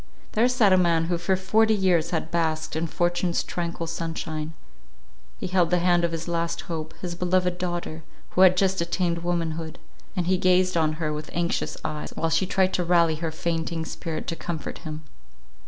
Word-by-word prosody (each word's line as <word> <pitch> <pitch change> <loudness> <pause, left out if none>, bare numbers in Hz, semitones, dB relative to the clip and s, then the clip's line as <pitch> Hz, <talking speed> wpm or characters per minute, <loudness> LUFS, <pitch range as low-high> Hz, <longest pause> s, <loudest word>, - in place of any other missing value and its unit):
There 235 +3 +3
sat 225 -6 +4
a - - +6
man 170 -2 +3
who 170 0 -1
for 190 +2 +1
forty 220 +4 +3
years 180 -5 +2
had 160 -2 -2
basked 160 -2 0
in 165 +1 0
fortune's 175 +1 0
tranquil 170 -1 -3
sunshine; 160 -1 -4 0.8
he - - -5
held 180 -2 +2
the 180 - +3
hand 175 0 +3
of 170 - +1
his 165 0 -4
last 170 0 -1
hope, 160 -2 -5
his 175 -2 -3
beloved 180 0 +1
daughter, 175 -3 -3 0.3
who 185 - +2
had 185 -1 +7
just 190 -1 +2
attained 170 0 0
womanhood; 165 -2 -2 0.4
and 180 -3 0
he 185 +1 +2
gazed 185 0 +3
on 155 -2 +2
her 155 -1 -2
with 150 0 -6
anxious 170 0 -1
eyes, 150 -1 -3
while 165 - 0
she 165 +3 +2
tried 190 0 +2
to 180 - +1
rally 170 -2 +3
her 165 +1 -2
fainting 165 0 -2
spirit 160 -1 -5
to 165 - -3
comfort 165 -2 -5
him. 155 -1 -7
170 Hz, 190 wpm, -25 LUFS, 165-180 Hz, 0.8 s, had